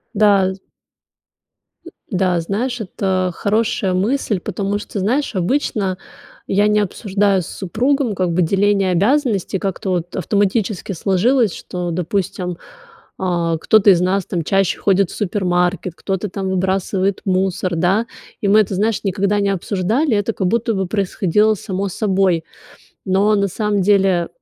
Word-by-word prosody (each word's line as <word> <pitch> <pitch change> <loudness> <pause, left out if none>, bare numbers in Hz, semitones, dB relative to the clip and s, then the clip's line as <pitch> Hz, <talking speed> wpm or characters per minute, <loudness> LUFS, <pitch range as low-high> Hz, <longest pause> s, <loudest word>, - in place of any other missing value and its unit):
Да, 200 -2 +4
з 190 - -14 1.3
М, - - -10 0.2
да, 185 -3 +1
знаешь, 230 +9 -2
это 185 -2 -1
хорошая 210 -2 0
мысль, 210 +1 0
потому 200 +2 -3
что, 210 -1 -6
знаешь, 240 +6 0
обычно 195 -1 0 0.5
я 205 +2 +2
не 210 0 +3
обсуждаю 200 -1 0
с 165 - -8
супругом 240 +5 -1
как 180 -2 0
бы 180 - +2
деление 195 +2 +2
обязанностей. 205 - +1
Как-то 195 0 -3
вот 175 -1 -2
автоматически 200 +1 0
сложилось, 200 +5 +2
что, 175 -1 -5
допустим, 180 0 -2 0.6
а, 170 -3 0
кто-то 210 +5 +4
из 175 - +4
нас 185 +1 +1
там 170 -3 -3
чаще 195 +2 +1
ходит 195 -2 +2
в - - -8
супермаркет, 180 -2 0
кто-то 195 +2 -3
там 190 0 -4
выбрасывает 190 +1 0
мусор, 185 -1 0
да. 190 +7 +1 0.3
И 205 - 0
мы 205 +2 +5
это, 195 -2 -2
знаешь, 215 +3 0
никогда 200 +1 0
не 200 - +1
обсуждали, 210 - 0
это 205 +2 -1
как 190 - -1
будто 230 +3 0
бы 190 -3 -1
происходило 205 +1 +1
само 195 0 -3
собой. 190 -4 +1 0.6
Но 195 +3 +2
на 200 -1 +1
самом 205 +1 -1
деле 190 -3 +3
195 Hz, 145 wpm, -19 LUFS, 185-210 Hz, 1.3 s, мы